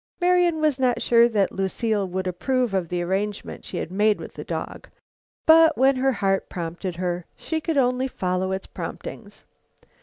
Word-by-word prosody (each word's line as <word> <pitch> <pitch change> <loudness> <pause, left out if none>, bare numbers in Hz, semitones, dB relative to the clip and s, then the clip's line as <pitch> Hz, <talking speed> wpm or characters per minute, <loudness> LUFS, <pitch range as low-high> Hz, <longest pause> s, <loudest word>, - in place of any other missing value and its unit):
Marian 355 -2 +3
was 300 -4 +2
not 255 -2 +2
sure 235 0 +4
that 205 -4 +1
Lucile 200 +1 -1
would 185 +1 -3
approve 245 +6 -1
of 185 -4 -1
the 175 -1 -1
arrangement 200 +3 -3
she 180 - -5
had 170 - -4
made 210 +2 +2
with - - -9
the - - -7
dog, - - -6 0.6
but 320 0 +6
when 265 +1 +4
her 265 +1 +2
heart 195 -3 0
prompted 175 +1 -5
her, 175 -1 -3
she 320 -1 -3
could 320 -1 -1
only 255 0 +2
follow 185 -5 -2
its 190 0 -3
promptings. - - -8
210 Hz, 175 wpm, -24 LUFS, 185-265 Hz, 0.6 s, but